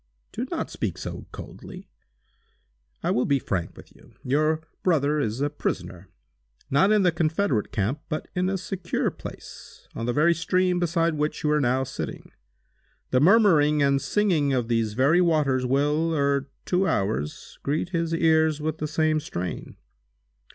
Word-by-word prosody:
"Do - - -4
not - - -3
speak - - -3
so - - -7
coldly. - - -10 1.2
I - - +1
will 125 - +1
be 140 - +3
frank 95 -9 -3
with - - -15
you. - - -20
Your 155 +4 +1 0.2
brother 150 -4 +2
is 115 -2 -2
a 145 - +1
prisoner—not 90 - -3
in 210 -2 +4
the 180 - +4
Confederate 160 - 0
camp, 110 +8 -1
but 155 - -3
in 180 0 0
a 195 - 0
secure 180 -1 -2
place, - - -11
on 115 - -4
the - - +2
very 155 +5 +4
stream 180 +2 +1
beside 170 -1 +1
which 150 0 -2
you 150 - +2
are 150 0 +3
now 130 0 +1
sitting. 135 - -6 0.8
The 130 - +4
murmuring 155 - +5
and 140 0 +2
singing 155 -4 +1
of 120 -3 -1
these 115 -2 0
very 140 +8 +4
waters 145 -7 +2
will, 150 +5 +1
ere 140 -1 +1 0.2
two 185 +1 +1
hours, 95 -7 -2
greet 150 +4 -1
his 170 -2 -1
ears 160 -2 +3
with 155 +1 -3
the 155 - -2
same 155 0 +1
strain. 90 - -6
150 Hz, 160 wpm, -25 LUFS, 130-165 Hz, 1.2 s, murmuring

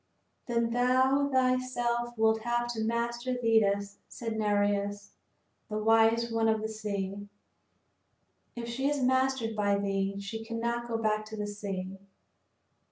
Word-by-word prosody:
"Then 235 -1 +1
thou 260 +3 +3
thyself 255 -2 0
wilt 220 0 +3
have 240 +1 0
to 220 -1 -2
master 235 +2 -1
Thetis," 205 -4 +1
said 225 -2 -5
Nereus, 205 -1 0 0.6
the 215 - -2
wise 225 +2 +3
one 225 0 +2
of 220 0 +2
the - - 0
sea. 205 -2 -4 1.3
"If 235 -1 -5
she 265 +4 -1
is 290 -1 0
mastered 260 -3 +1
by 205 -1 +2
thee, 195 0 -1
she 220 +3 -5
cannot 235 +1 -2
go 230 -1 -1
back 215 -1 0
to 220 0 -8
the 210 - -2
sea. 195 -2 -5
225 Hz, 135 wpm, -30 LUFS, 205-240 Hz, 1.3 s, thou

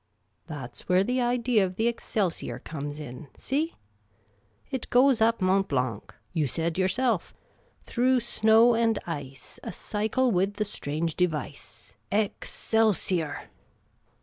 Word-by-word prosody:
Tljat 130 -6 -6
's - - -10
where 180 +1 +5
the 250 +4 0
idea 240 -3 +2
of 185 -1 -2
the 225 +4 +1
Excelsior 215 -6 -1
Qoxwif?, 145 -1 -6
in; 145 0 -8
see? 305 +5 -1 0.5
' 105 +1 -38
It 260 -3 -4
goes 250 -1 +5
up 225 -2 +3
Mont 190 +1 +3
Blanc,' 125 -6 -2 0.2
you 155 -4 +1
said 165 +5 -1
yourself. 195 +2 +1 0.3
' - - -35
Tiirough 255 +1 +2
snow 225 0 +5
and 225 -1 +2
ice, 140 -5 -7
A - - -4
cycle 220 +7 0
with 195 +1 +1
the 210 +1 -1
.strange 160 -4 -3
device. 155 - -3 0.2
Excelsior 205 -5 0
195 Hz, 135 wpm, -27 LUFS, 155-230 Hz, 0.5 s, where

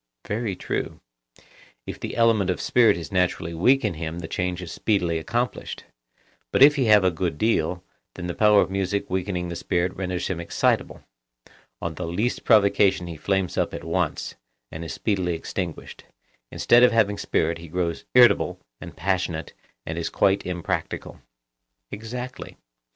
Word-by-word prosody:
Very 105 -2 -2
true. - - -4 0.9
If - - -7
the - - -5
element 115 -5 +3
of 90 - -1
spirit 115 -6 +4
is 85 +4 -7
naturally 90 -2 0
weak 125 +10 +3
in 105 - 0
him 80 +1 -5
the 85 -2 -6
change 90 0 -2
is 85 - -7
speedily 90 -6 0
accomplished, 120 +9 -3 0.7
but - - +5
if 145 +1 +8
he 135 -4 +1
have 105 -3 +6
a 95 - +3
good 85 -2 -2
deal, 90 -4 0 0.3
then 90 - -6
the 90 - -3
power 105 0 +5
of - - -2
music 95 +1 -2
weakening 90 -1 -2
the 85 - -5
spirit 90 +2 -1
renders 90 -2 -3
him 95 -3 -3
excitable;—on - - -4
the 85 +1 -5
least 105 +9 -1
provocation 100 -4 +4
he 85 -1 -7
flames 95 +3 -1
up - - -1
at - - -7
once, - - -2 0.4
and 80 - -6
is 80 - -6
speedily 90 +1 -1
extinguished; 85 0 -6 0.4
instead 120 - +4
of 125 - +6
having 105 -3 +2
spirit 85 +1 0
he 85 - -10
grows 85 0 -2
irritable 125 -1 +5 0.2
and - - -10
passionate 90 -2 -2 0.3
and 80 +1 -4
is 85 - -2
quite 100 -1 +1
impracticable. 90 -3 -4 0.7
Exactly. 125 +4 -7
90 Hz, 160 wpm, -24 LUFS, 85-105 Hz, 0.9 s, if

